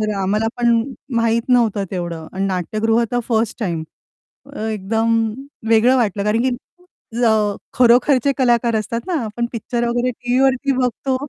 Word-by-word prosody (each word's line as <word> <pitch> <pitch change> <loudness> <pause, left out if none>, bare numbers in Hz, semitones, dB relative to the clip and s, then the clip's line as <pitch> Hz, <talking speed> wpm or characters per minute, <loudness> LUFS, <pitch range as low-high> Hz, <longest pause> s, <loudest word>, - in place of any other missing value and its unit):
तर 215 0 0
आम्हाला 210 +4 0
पण 235 -1 +3 0.3
माहीत 230 0 +2
नव्हतं 230 -5 +2
तेवढं 170 -3 -5
आणि 190 +1 -2
नाट्यगृह 215 +5 0
तर 245 - +1
फर्स्ट 225 -1 0
टाइम. 170 -6 -2 0.7
अ, - - -8
एकदम 220 +1 0 0.4
वेगळं 230 +3 +5
वाटलं 205 -4 0
कारण 210 +2 +1
की 255 -1 +1 0.7
अ, - - +5 0.4
खरोखरचे 255 +2 +4
कलाकार 240 -3 +2
असतात 220 +2 -2
ना, 370 - -2
आपण 225 +2 -3
पिक्चर 240 +1 -2
वगैरे 240 +1 0
टीव्हीवरती 260 +3 +1
बघतो 260 +1 -1
230 Hz, 145 wpm, -19 LUFS, 215-245 Hz, 0.7 s, वेगळं